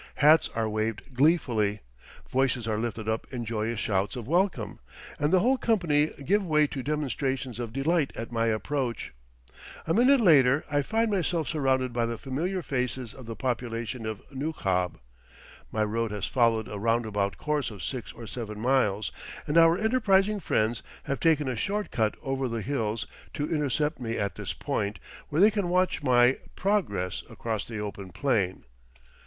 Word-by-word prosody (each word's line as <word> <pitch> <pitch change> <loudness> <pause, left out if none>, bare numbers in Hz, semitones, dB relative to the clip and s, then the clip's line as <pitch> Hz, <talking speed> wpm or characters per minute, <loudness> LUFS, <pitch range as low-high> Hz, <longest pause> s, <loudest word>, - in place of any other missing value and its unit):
Hats 155 +3 +5
are 115 -1 0
waved 110 +4 -3
gleefully, 120 -8 +2 0.5
voices 130 -3 0
are 110 -1 0
lifted 110 -1 -3
up 110 0 -1
in 120 -3 -4
joyous 110 0 -2
shouts 100 +2 0
of 120 -3 -6
welcome, 175 - 0 0.4
and 150 +1 +1
the 185 - +5
whole 255 +5 +3
company 170 -11 +2 0.2
give 205 +5 +3
way 155 -4 +3
to 140 -2 -4
demonstrations 135 -4 -2
of 120 -2 -4
delight 140 +4 +1
at 115 +1 -6
my 115 -1 +1
approach. 120 +2 -2 0.7
A 165 - +1
minute 255 +6 +5
later 145 - +5
I 145 0 +3
find 225 +9 0
myself 170 -5 0
surrounded 130 -4 +1
by 120 -1 +1
the 115 0 -3
familiar 170 - -2
faces 125 -4 -2
of 130 -3 -12
the 115 - -5
population 120 -2 -3
of 110 -2 -5
Nukhab 100 - -1 0.7
my 110 - +1
road 115 +2 -1
has 105 -2 -3
followed 115 -3 +2
a 105 - -6
roundabout 105 -3 0
course 150 -3 -1
of 105 -3 -9
six 125 -5 -4
or 115 - -10
seven 105 -1 -6
miles, 110 -4 +1 0.3
and 150 - -2
our 165 +1 +6
enterprising 210 -2 +3
friends 110 - 0 0.2
have 140 -2 -2
taken 155 -4 +3
a 130 - -1
short 205 - -2
cut 110 -3 +1
over 135 -1 -1
the 115 -2 -3
lulls 115 -4 -1 0.3
to 145 - -1
intercept 150 0 0
me 115 -2 -3
at 100 -1 -1
this - - -5
point, 100 +1 -2 0.3
where 150 - 0
they 210 +2 +7
can 200 -4 -1
watch 180 -1 +2
my, 125 -1 +4 0.2
progress 155 - 0
across 110 -3 -3
the 115 - -6
open 100 -2 -5
plain. 95 -2 0
130 Hz, 170 wpm, -28 LUFS, 110-155 Hz, 0.7 s, they